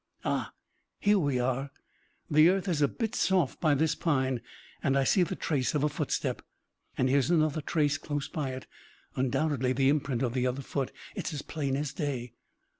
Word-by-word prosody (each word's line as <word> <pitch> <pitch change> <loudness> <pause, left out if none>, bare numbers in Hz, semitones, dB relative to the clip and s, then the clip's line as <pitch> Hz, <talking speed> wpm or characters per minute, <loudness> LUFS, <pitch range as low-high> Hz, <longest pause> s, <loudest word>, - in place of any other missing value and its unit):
"Ah! - - -1 0.5
here 205 0 +4
we 140 -6 +1
are. 130 +2 -1 0.6
The 155 +3 +6
earth 195 +1 +1
is 165 -5 0
a 145 - +5
bit 225 - -3
soft 185 - +1
by 155 -3 +4
this 155 +3 +2
pine, 130 -6 0 0.4
and 140 -2 +2
I 135 - +3
see 185 +8 +3
the 175 - 0
trace 140 -2 0
of 145 - +1
a 150 - +3
footstep! - - -2 0.6
And 130 - +2
here 135 +2 +4
is 135 - 0
another 155 -3 +2
trace, 150 0 +1
close 145 -2 -3
by 150 -6 -3
it, 130 - -7 0.5
undoubtedly 130 0 +1
the 135 +1 +3
imprint 140 -4 0
of 120 -2 0
the 130 -1 +1
other 130 +2 -2
foot. 135 0 -2 0.2
It's 160 - -3
as 145 - -5
plain 140 -4 -2
as 145 -1 -3
day." 130 -7 -3
145 Hz, 190 wpm, -29 LUFS, 130-155 Hz, 0.6 s, The